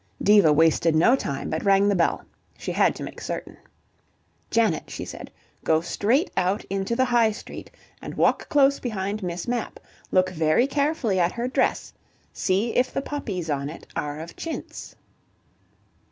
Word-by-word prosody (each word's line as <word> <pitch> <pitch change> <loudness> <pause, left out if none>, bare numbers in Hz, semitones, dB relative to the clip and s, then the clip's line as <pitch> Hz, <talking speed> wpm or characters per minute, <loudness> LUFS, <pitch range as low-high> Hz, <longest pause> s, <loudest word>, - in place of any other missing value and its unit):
Diva 205 -6 +6
wasted 160 +1 +3
no 205 +11 +5
time, 140 - -4
but 160 - -2
rang 195 0 +4
the 205 - +3
bell. 175 -3 +1 0.3
She - - -4
had - - +2
to - - -7
make - - -8
certain. - - -5 0.9
"Janet," 230 -1 +1
she - - -6
said, - - -9 0.3
"go 160 0 +3
straight 225 - 0
out 190 +3 0
into 195 +3 -1
the 260 +1 +2
High 240 -3 +3
Street, 210 - -9 0.3
and - - -7
walk - - +2
close 280 -2 +4
behind 210 -3 -3
Miss 175 +1 -4
Mapp. 240 -1 -3 0.3
Look 185 0 +2
very 160 +7 +2
carefully 280 - 0
at 175 0 +2
her 240 +1 -2
dress; 255 - 0 0.4
see 205 +5 0
if 255 +1 +2
the 270 - -3
poppies 205 - -4
on 140 -2 -2
it 160 - -10
are 145 0 -3
of 165 +1 -9
chintz." 330 - -7
200 Hz, 165 wpm, -24 LUFS, 170-240 Hz, 0.9 s, Diva